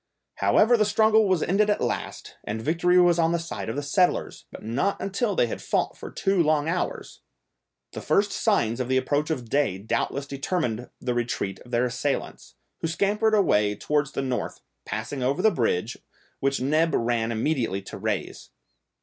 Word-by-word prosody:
However 240 +3 +4
the 215 - +4
struggle 220 +1 +4
was 185 -4 +2
ended 210 +4 +2
at 205 - +2
last, - - -4
and 110 +2 -4
victory 175 +8 +2
was 175 -1 +4
on 165 0 +3
the - - +2
side 165 -8 -5
of 115 - -3
the 145 - -3
settlers, 175 +6 0
but - - -10
not 125 - -1
until 200 +2 -1
they - - +3
had 115 - -5
fought - - -1
for - - -9
two 195 -2 +1
long 155 -1 +2
hours! 175 +2 -3 0.7
The - - -7
first 200 0 +2
signs 125 - +1
of 125 - -2
the 130 0 +2
approach 145 +4 0
of 130 -7 -3
day 135 -7 +1
doubtless 115 +6 -2
determined 135 -4 -3
the 125 - -2
retreat 120 -5 -2
of 125 - -16
their 120 0 +1
assailants, 125 +3 -3 0.2
who - - -2
scampered 210 +6 +1
away 105 - +3
towards 150 +2 -1
the - - -2
North, 130 -2 -3 0.2
passing 110 +5 -4
over 135 +8 0
the 220 - +5
bridge, 115 - -1 0.4
which 135 0 0
Neb 155 +5 +2
ran 115 -1 0
immediately 115 -5 -1
to - - -8
raise. - - -3
145 Hz, 180 wpm, -25 LUFS, 120-180 Hz, 0.7 s, the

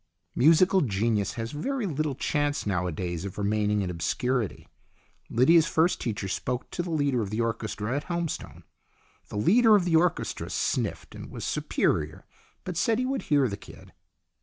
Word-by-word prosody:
Musical 175 +7 +5
genius 105 -3 0
has 115 -1 -4
very 255 - -2
little 155 -4 -1
chance 145 +2 -1
nowadays 90 -3 -2
of 100 -2 -6
remaining 105 0 +1
in 90 - -3
obscurity. 110 +7 -2 0.6
Lydia's 160 +7 +5
first 165 +2 +2
teacher 105 -4 -3
spoke 125 +6 -3
to - - -2
the 175 - -5
leader 145 -6 +1
of 100 - -3
the 110 +2 -3
orchestra 115 0 -2
at 145 - -3
Helmstone. 170 -2 -4 0.7
The - - -5
leader 220 - +5
of 195 -4 +2
the 170 -2 +2
orchestra 175 +2 0
sniffed - - -2
and - - -9
was - - -6
superior, - - -1 0.4
but - - -5
said 230 -3 +2
he 255 - 0
would 265 +1 -1
hear 145 -3 +4
the 100 -3 -4
kid. - - -14
130 Hz, 160 wpm, -27 LUFS, 105-165 Hz, 0.7 s, Musical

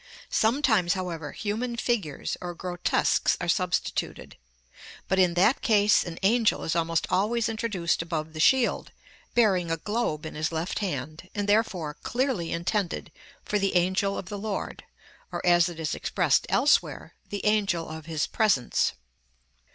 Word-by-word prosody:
Sometimes, 220 -6 +2
however, 170 -5 -4
human 225 +3 -3
figures, 220 - -2
or 175 -1 -5
grotesques, 175 0 +1
are 175 - -3
substituted; 180 +1 -1 0.7
but, 190 - +1
in 180 -2 +3
that 200 +9 +3
case, 210 -5 +4
an 170 -2 -7
angel 225 +2 +3
is 160 - -1
almost 165 0 +1
always 220 +4 +1
introduced 215 -8 -1
above 160 -2 -4
the 155 - -7
shield, 255 +9 +3 0.4
bearing 190 -7 +3
a 165 - 0
globe 185 -5 -2
in 160 - -6
his 155 +2 -2
left 165 +3 -2
hand, 155 -2 -4
and 205 -1 -2
therefore 200 -8 +1
clearly 245 -9 -1
intended 175 +2 -2 0.3
for 210 - 0
the 195 -1 0
'Angel 190 +3 +1
of - - -5
the 205 +1 -5
Lord,' 205 -1 -4 0.5
or, - - -3
as 175 0 +5
it 170 -2 -9
is 155 -3 -2
expressed - - +1
elsewhere, - - +2 0.2
the 205 - -5
'Angel 200 -6 +1
of 160 0 -8
His 160 -2 -1
Presence.' 200 - +1
185 Hz, 150 wpm, -27 LUFS, 165-215 Hz, 0.7 s, as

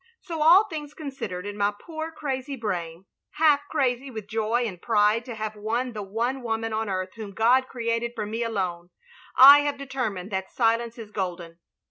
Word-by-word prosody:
So 330 -3 -5
all 345 +6 +7
things 295 -4 -7
considered 265 - -6
in 205 0 -5
my 205 0 +2
poor 320 -1 -6
crazy 275 -3 -4
brain 180 -6 -4
— - - -63
half 300 -2 +4
crazy 265 -2 0
with 220 -5 -7
joy 225 +3 0
and 185 -6 -6
pride 215 0 +2
to 240 - -6
have 215 0 -4
won 230 +4 -2
the 210 - -5
one 230 +7 -2
woman 225 -1 -2
on 220 -1 -2
earth 185 -1 -3
whom 210 -3 -7
God 250 +5 +3
created 235 -1 -2
for 215 - -3
me 225 +3 -4
alone 185 -6 -2 0.3
— - - -24
I 280 +3 +11
have 290 -1 -1
determined 245 -9 -4
that 190 -1 -3
silence 230 0 0
is 220 -3 -9
golden. 175 -4 -5
230 Hz, 190 wpm, -25 LUFS, 205-265 Hz, 0.3 s, I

